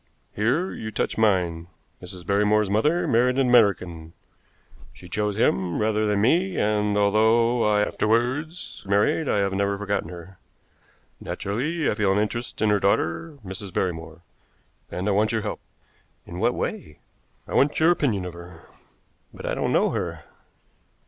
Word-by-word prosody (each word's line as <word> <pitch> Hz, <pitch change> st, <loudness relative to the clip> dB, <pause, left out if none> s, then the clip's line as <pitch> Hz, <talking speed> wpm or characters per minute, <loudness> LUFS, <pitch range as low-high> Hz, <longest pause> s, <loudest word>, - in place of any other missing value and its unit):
Here 130 Hz, -, 0 dB
you 110 Hz, -, -6 dB
touch 110 Hz, -, -2 dB
mine. 90 Hz, -6 st, +1 dB, 0.3 s
Mrs. 90 Hz, -1 st, -10 dB
Barrymore's 105 Hz, +1 st, +2 dB
mother 150 Hz, +12 st, +2 dB
married 125 Hz, +2 st, +2 dB
an 135 Hz, -2 st, +3 dB
American. 90 Hz, -8 st, +2 dB, 0.8 s
She 90 Hz, -, -14 dB
chose 105 Hz, +2 st, -2 dB
him 95 Hz, -5 st, +1 dB
rather 110 Hz, 0 st, +1 dB
than 105 Hz, -1 st, +1 dB
me, 175 Hz, -, +2 dB
and, 105 Hz, -1 st, +1 dB
although 110 Hz, +4 st, +3 dB
I 105 Hz, 0 st, +3 dB
afterwards 125 Hz, +12 st, -1 dB
married, 105 Hz, +9 st, +2 dB
I -, -, +2 dB
have 100 Hz, -1 st, 0 dB
never 100 Hz, +1 st, 0 dB
forgotten 100 Hz, -1 st, -2 dB
her. 90 Hz, +1 st, -11 dB, 0.8 s
Naturally, 145 Hz, +11 st, -2 dB
I -, -, +2 dB
feel 105 Hz, -2 st, +1 dB
an 95 Hz, -, +1 dB
interest 110 Hz, +2 st, -2 dB
in 105 Hz, -, +3 dB
her 105 Hz, -, +3 dB
daughter, 100 Hz, -, 0 dB
Mrs. 95 Hz, +1 st, -7 dB
Barrymore, 85 Hz, -2 st, -3 dB, 0.7 s
and 90 Hz, +3 st, -4 dB
I -, -, +2 dB
want 105 Hz, +2 st, +2 dB
your 110 Hz, -2 st, -1 dB
help." 105 Hz, -, -4 dB, 0.7 s
"In 85 Hz, -, -8 dB
what 120 Hz, +4 st, +1 dB
way?" 75 Hz, -, -4 dB, 0.5 s
"I -, -, -7 dB
want 145 Hz, +2 st, +2 dB
your 160 Hz, +2 st, +5 dB
opinion 115 Hz, -, 0 dB
of 90 Hz, -, -6 dB
her." 85 Hz, -1 st, -12 dB, 0.7 s
"But -, -, -10 dB
I -, -, -1 dB
don't -, -, -1 dB
know -, -, +2 dB
her." -, -, -4 dB
105 Hz, 155 wpm, -24 LUFS, 95-115 Hz, 0.8 s, your